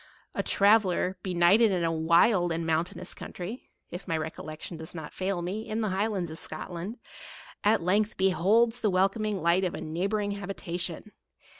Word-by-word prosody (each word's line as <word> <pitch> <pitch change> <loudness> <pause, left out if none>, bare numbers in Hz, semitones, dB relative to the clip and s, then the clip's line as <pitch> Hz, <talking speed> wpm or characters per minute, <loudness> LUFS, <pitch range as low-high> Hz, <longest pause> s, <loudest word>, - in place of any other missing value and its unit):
A - - 0
traveller, 195 -3 +3
benighted 185 +5 +4
in 180 -2 0
a 165 - +1
wild 170 +3 +3
and 165 0 -2
.mountainous 165 +3 -1
country, 195 +8 -7 0.2
(if 175 +3 -7
my 165 - 0
re 160 0 -2
collection 155 +2 -7
does 160 +1 -7
not 160 -2 -7
fail 185 -2 -2
me, 205 +5 -4
in 220 +1 -1
the 215 - 0
Highlands 190 -3 -1
of 160 - -7
Scotland,) 175 +7 -6 0.7
at 210 -3 +3
length 205 +4 +1
beholds 205 +6 +3
the 215 - +2
welcome 195 +3 +2
light 190 -4 +1
of 180 - -1
a - - -5
neighbouring 195 +6 -1
habitation. 185 -1 -5
185 Hz, 165 wpm, -28 LUFS, 170-205 Hz, 0.7 s, benighted